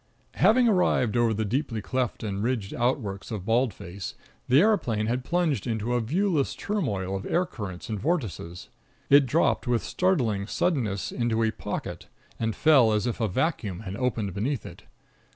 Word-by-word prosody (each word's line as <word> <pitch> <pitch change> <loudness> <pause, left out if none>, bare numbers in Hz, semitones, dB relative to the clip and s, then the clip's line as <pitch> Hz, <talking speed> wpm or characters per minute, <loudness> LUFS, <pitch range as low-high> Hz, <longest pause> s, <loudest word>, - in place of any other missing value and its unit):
Having 240 +2 +4
arrived 180 - +2
over 120 -1 +3
the 110 0 -1
deeply 120 +1 -1
cleft 125 +3 -2
and 100 -2 -3
ridged 115 -4 -1
outworks 120 -6 -1
of 105 -5 -5
Bald 120 +2 +2
Face, 90 +1 -8 0.3
the 130 +3 +5
aeroplane 125 - +2
had 125 +3 -1
plunged 160 - 0
into 115 +1 -1
a 120 - +2
viewless 160 - 0
turmoil 105 - -2
of 95 - -5
air 180 +1 +2
currents 95 - -7
and 110 -2 -3
vortices. 105 - -3 0.4
It 140 -1 +7
dropped 150 0 +1
with 120 -2 +1
startling 120 - 0
suddenness 110 - -1
into 115 -2 0
a 110 - +2
"pocket," - - -6 0.3
and 110 -1 -1
fell 135 -8 +5
as 105 +1 +1
if 120 0 -2
a 110 - +2
vacuum 105 - -1
had 95 -2 -6
opened 115 -5 -1
beneath 115 +5 -2
it. - - -11
115 Hz, 170 wpm, -26 LUFS, 105-140 Hz, 0.4 s, It